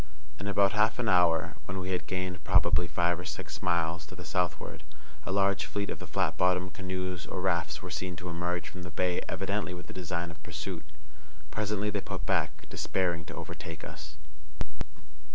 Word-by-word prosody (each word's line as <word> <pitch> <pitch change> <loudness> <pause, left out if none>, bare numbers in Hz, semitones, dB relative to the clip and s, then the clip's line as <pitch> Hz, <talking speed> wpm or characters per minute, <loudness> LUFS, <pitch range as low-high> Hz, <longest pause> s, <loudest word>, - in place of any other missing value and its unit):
In 100 - -3
about 100 -1 +5
half 105 +2 +4
an 120 -1 0
hour, 90 -4 +5
when 90 - -3
we 95 0 -2
had 90 - 0
gained 90 -2 -2
probably 85 -2 +5
five 85 0 +2
or - - -4
six 80 -4 -5
miles 85 -1 +2
to - - -9
the - - -8
southward, 90 -5 0 0.5
a - - 0
large 100 0 +3
fleet 100 -1 -1
of - - -4
the 90 - -7
flat 80 -2 +1
bottomed 90 +1 +3
canoes 95 -2 -3
or - - -2
rafts 90 -2 +1
were - - -5
seen 90 -1 -2
to 90 +1 -6
emerge 85 +1 -1
from 90 - -7
the 90 - -5
bay 90 +2 +1
evidently 95 -1 0
with 90 - -7
the - - -9
design 85 -1 -2
of 80 -2 -13
pursuit. 80 +1 -4 0.7
Presently 105 -1 +1
they 100 -1 0
put - - -4
back, - - +1
despairing 85 -3 0
to - - -7
overtake 80 -1 -6
us. 75 -1 -7
90 Hz, 190 wpm, -31 LUFS, 85-95 Hz, 0.7 s, about